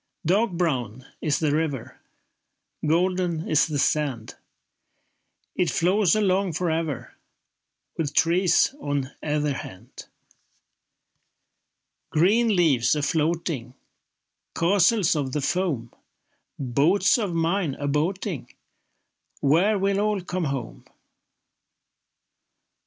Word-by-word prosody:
Dark 195 +5 +2
brown 130 - -2 0.2
is 150 -2 +1
the 155 -3 0
river, 150 -6 -3 0.8
Golden 175 0 0
is 155 0 +3
the 150 -2 -3
sand. 135 -6 -1 1.2
It 180 - +1
flows 185 +2 +2
along 195 -3 +1
for 170 +2 -1
ever, 160 -4 -3 0.9
With 150 -3 -2
trees 175 +7 +3
on 140 -2 -2
either 150 -1 -1
hand. 115 -1 -10 2.0
Green 210 +7 +3
leaves 150 -8 +3
a 150 - -2
floating, 155 -5 -1 0.8
Castles 190 +1 +3
of 135 -4 -2
the 150 - -1
foam, 140 -8 -2 0.6
Boats 155 - +2
of 195 -6 -2
mine 165 -2 0
a 145 - -4
boating— 165 - -2 0.9
Where 180 +9 +3
will 195 0 +1
all 210 -1 0
come 180 -1 -3
home? 135 -5 -5
165 Hz, 95 wpm, -24 LUFS, 145-185 Hz, 2.0 s, is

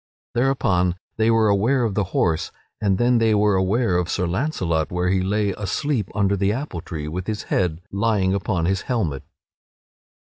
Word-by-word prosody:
Thereupon, 115 -9 +1 0.2
they 110 0 +2
were 115 -1 +4
aware 115 +6 +2
of 110 -4 0
the 100 0 0
horse, 85 -3 0 0.3
and 100 -3 +2
then 120 +1 +3
they 110 -1 +3
were 105 0 +3
aware 95 +1 +1
of 90 -1 -2
Sir 90 - 0
Launcelot 90 - -1
where 90 0 0
he 95 0 +2
lay 100 +2 0
asleep 105 +4 -2
under 100 -1 +2
the 100 +1 +1
apple 115 - -4
tree, 75 -2 -6
with 90 +4 -5
his 110 -1 -3
head 85 -2 0
lying 100 -2 +1
upon 95 -3 -1
his 95 +2 0
helmet. 85 - -2
100 Hz, 175 wpm, -22 LUFS, 90-110 Hz, 0.3 s, were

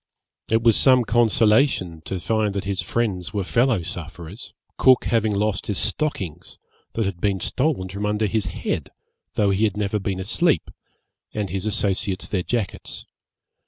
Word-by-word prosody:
It 115 +1 +2
was 115 -2 +5
some 130 -2 +6
consolation 110 - +3
to 95 - -3
find 105 +1 0
that 100 - -1
his 100 -1 -1
friends 105 -5 -2
were 100 - 0
fellow 115 -1 +2
sufferers, 85 +6 -8 0.3
Cook 130 -1 +5
having 110 -2 +2
lost 105 -1 -1
his 100 - -1
stockings, 100 - -1 0.4
that 115 - 0
had 95 -3 -4
been 100 -2 +1
stolen 130 -7 0
from 100 +2 -3
under 105 +1 +1
his 105 -1 0
head, 90 - -3 0.5
though 100 -2 +3
he 100 +3 +1
had 105 -2 +1
never 105 0 0
been 95 -1 -3
asleep, 145 - +1 0.6
and 105 -4 -2
his 95 +2 -2
associates 95 -2 -1
their 95 - -1
jackets. 110 0 -3
105 Hz, 160 wpm, -23 LUFS, 95-115 Hz, 0.6 s, some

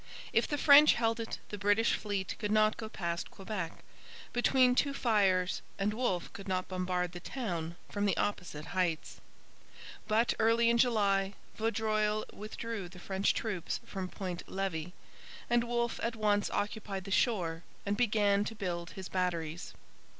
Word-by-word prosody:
If - - +3
the 290 - -1
French 290 +1 +8
held 230 -1 +1
it 225 - -4
the 205 - -6
British 205 +3 +3
fleet 200 -3 -2
could 210 - -2
not 215 0 +4
go 220 - -6
past 170 -4 -3
Quebec, 195 -4 -5 0.5
between 250 +1 +4
two 280 +2 +1
fires, 195 -7 +2 0.2
and 205 +1 0
Wolfe 215 -7 -1
could 200 0 -9
not 185 -1 -1
bombard 180 -1 -1
the 175 - -7
town 175 -7 -4
from 205 0 -1
the 185 -5 +1
opposite 175 -6 -2
heights. 175 -4 -1 0.9
But, 225 +2 +3
early 230 +1 +4
in 235 - +2
July, 200 -5 +2 0.2
Vaudreuil 215 -1 0
withdrew 215 -2 -5
the 180 - -13
French 190 +2 0
troops 195 -7 -2
from 190 -2 -5
Point 180 -3 -5
Levis, 180 -4 -2 0.6
and 240 0 +4
Wolfe 235 0 -1
at 230 0 -1
once 205 -2 +2
occupied 205 -2 -3
the 195 - -8
shore 175 -8 +1 0.2
and 200 0 0
began 205 -3 +3
to 225 - -5
build 175 -4 -4
his 190 -1 -5
batteries. 175 -2 -2
205 Hz, 155 wpm, -32 LUFS, 185-225 Hz, 0.9 s, French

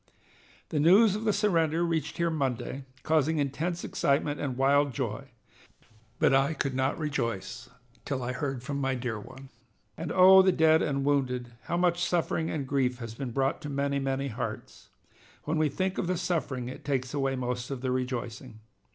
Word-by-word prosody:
"The 150 - -1
news 195 +7 +6
of 215 +1 -4
the 215 - +3
surrender 170 -5 +2
reached 165 -2 -2
here 170 -1 +1
Monday, 135 -2 -2 0.2
causing 160 0 +2
intense 150 +5 -2
excitement 145 +1 0
and 130 -4 -3
wild 140 0 +3
joy; - - -4 0.9
but - - +3
I 135 +4 +3
could 135 -1 -2
not 130 +1 0
rejoice 120 - -3 0.3
till 130 -3 -3
I 120 - -2
heard 130 -1 -3
from 140 +1 -3
my 135 -1 0
dear 120 -3 -3
one. 130 +5 -12 0.5
And, 160 -1 -5
oh, 190 +1 +8
the 190 0 +4
dead 160 -2 +4
and 140 -2 -1
wounded, 125 -4 0
how 175 - -1
much 175 0 +2
suffering 165 -2 0
and 145 -4 -3
grief 130 -2 0
has 115 -3 -7
been 130 +2 -5
brought 135 +5 0
to 150 - -6
many, 140 0 -1
many 135 0 -1
hearts! 110 - -6 0.5
When 155 +1 -1
we 155 -1 +3
think 185 +6 -2
of - - -1
the 180 0 0
suffering 140 -8 -2
it 130 - -8
takes 130 -2 -2
away 135 -2 0
most 125 -1 -3
of 135 -3 -5
the 130 -1 -1
rejoicing. 125 -2 -4
140 Hz, 180 wpm, -28 LUFS, 130-160 Hz, 0.9 s, oh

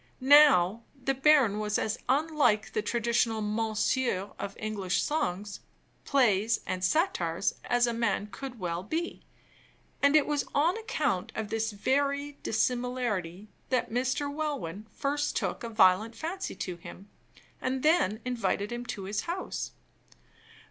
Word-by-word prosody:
Now, 260 -8 +6 0.2
the 270 +1 0
baron 270 -6 +4
was 210 0 0
as 220 +2 -2
unlike 285 -6 +2
the 215 - 0
traditional 230 0 0
"Mounseer" 215 0 0
of 200 - -5
English 200 -4 -1
songs, 205 - -2 0.5
plays, 225 -5 +2
and 185 0 -3
satires, 190 - +1
as 245 0 +3
a 235 - -1
man 230 -3 0
could 260 -1 -7
well 175 -2 -2
be; 320 - -4 0.8
and 280 +1 +4
it 305 - +5
was 295 -1 0
on 320 +6 +3
account 300 - -1
of 220 -1 -3
this 225 0 -1
very 280 +6 -1
dissimilarity 225 -6 -1 0.2
that 255 -4 0
Mr. 255 +3 0
Welwyn 285 - -4
first 290 +1 -1
took - - -2
a 235 - -4
violent 215 +1 +4
fancy 370 +8 -4
to 180 -2 -5
him, 190 +3 -11 0.5
and 260 0 -2
then 270 - +3
invited 210 -4 -1
him 240 0 -5
to 200 - -5
his 205 +2 -2
house. 370 +2 -4
235 Hz, 135 wpm, -29 LUFS, 205-280 Hz, 0.8 s, Now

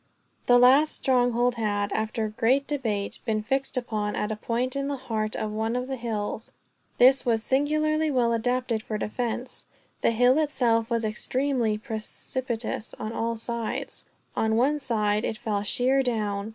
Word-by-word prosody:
The 245 - +7
last 265 +5 +5
stronghold 245 -2 +2
had, 205 -2 -1
after 220 +1 -1
a 215 - -4
great 250 +6 +2
debate, 225 -9 -2
been 215 -2 -1
fixed 270 +3 -1
upon 215 -4 -2
at 210 - -2
a - - -1
point 240 +4 -2
in 275 0 -1
the 285 - -1
heart 220 -4 -3
of 215 - -3
one 220 +2 -1
of 250 +1 -2
the 265 - -3
hills. 225 -2 -4 0.4
This 260 +2 +6
was 225 -3 +1
singularly 305 +4 +1
well 245 -4 +2
adapted 245 0 0
for 215 -1 -4
defense 240 +3 -4 0.3
The - - +3
hill 245 +5 +4
itself 240 -7 +1
was 230 -2 0
extremely 240 0 0
precipitous 225 +1 -4
on 215 - -5
all 230 0 -1
sides. 230 0 -4 0.3
On 220 0 +1
one 280 +6 +2
side, 215 -5 0
it 220 - -2
fell 210 -2 -2
sheer 250 +6 +2
down. 210 -4 -1
235 Hz, 165 wpm, -26 LUFS, 220-260 Hz, 0.4 s, The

